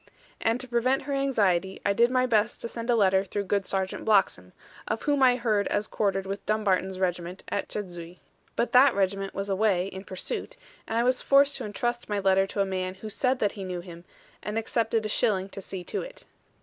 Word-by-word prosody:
And 225 +2 +1
to 255 - -5
prevent 250 +3 +1
her 280 +1 -3
anxiety, 200 -9 +1
I 200 - +3
did 235 +4 +4
my 255 0 +2
best 225 -2 +1
to - - -3
send 230 +1 -6
a 240 - +4
letter 190 -3 +3
through 200 +1 -3
good 200 0 -1
Sergeant 190 -1 -2
Bloxham, 190 - +2 0.4
of 220 - -2
whom 285 -2 +1
I 255 -1 +6
heard 220 -5 +1
as 205 +1 -1
quartered 195 -2 -1
with 195 +1 -5
Dumbarton's 190 -3 +1
regiment 180 0 -2
at 200 - -2
Chedzuy. 175 -3 -6 0.4
But 235 - 0
that 255 +1 +6
regiment 195 0 -1
was 195 +1 -3
away 195 -2 +1
in 190 0 -8
pursuit; 185 -2 -4 0.3
and 225 - -2
I 235 - +3
was 255 +1 +2
forced 280 +1 +4
to - - -5
entrust 240 +3 -3
my 205 - 0
letter 195 -1 +3
to 200 - -2
a - - +2
man 185 -1 -3
who 215 +3 -7
said 260 +4 +1
that 205 -4 +1
he 200 - -7
knew 180 -2 -4
him, 170 -1 -11 0.4
and 210 +1 -4
accepted 225 -1 0
a - - +1
shilling 200 -3 +1
to 195 - -8
see 190 -1 -6
to - - -3
it. - - -10
205 Hz, 215 wpm, -27 LUFS, 190-235 Hz, 0.4 s, I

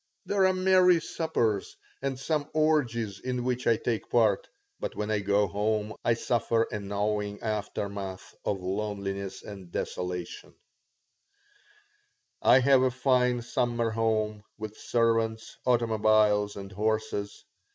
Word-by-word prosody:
There 195 -2 +3
are 185 - +2
merry 185 -1 +5
suppers, 120 - -1 0.2
and 135 -1 -2
some 150 +1 -1
orgies 120 -10 +1
in 125 -1 -3
which 125 0 -1
I 115 - +4
take 115 -3 -2
part, 110 -5 +3 0.3
but - - -4
when 105 +1 -2
I 105 - +2
go 100 +1 +2
home 105 +2 -1
I 120 - +3
suffer 115 -1 +1
a 105 - -3
gnawing 105 +1 -2
aftermath 100 -3 -4
of 95 -2 -1
loneliness 100 0 -3
and 95 -4 -10
desolation 90 -1 -4 1.9
I 130 - +6
have 135 0 +5
a 130 - +3
fine 125 -1 +2
summer 120 -1 0
home, 110 -1 0 0.2
with 110 -1 -6
servants, 115 -1 0
automobiles, 110 -3 +3
and 100 0 -8
horses. 110 0 -2
110 Hz, 125 wpm, -28 LUFS, 100-125 Hz, 1.9 s, I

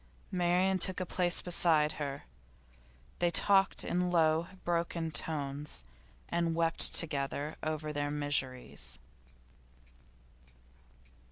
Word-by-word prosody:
Marian 180 +1 +1
took 185 +1 +3
a 185 - -2
place 175 0 +1
beside 160 -4 +3
her. 140 -1 -5 1.0
They 175 - +2
talked 195 +2 +3
in 180 0 -1
low, 165 -1 +2 0.2
broken 170 -1 -2
tones, 145 - -2 0.4
and 170 -1 -1
wept 165 0 +4
together 145 -1 -1
over 155 -1 -4
their 145 0 -2
miseries. 145 -3 -2
165 Hz, 95 wpm, -31 LUFS, 145-175 Hz, 1.0 s, wept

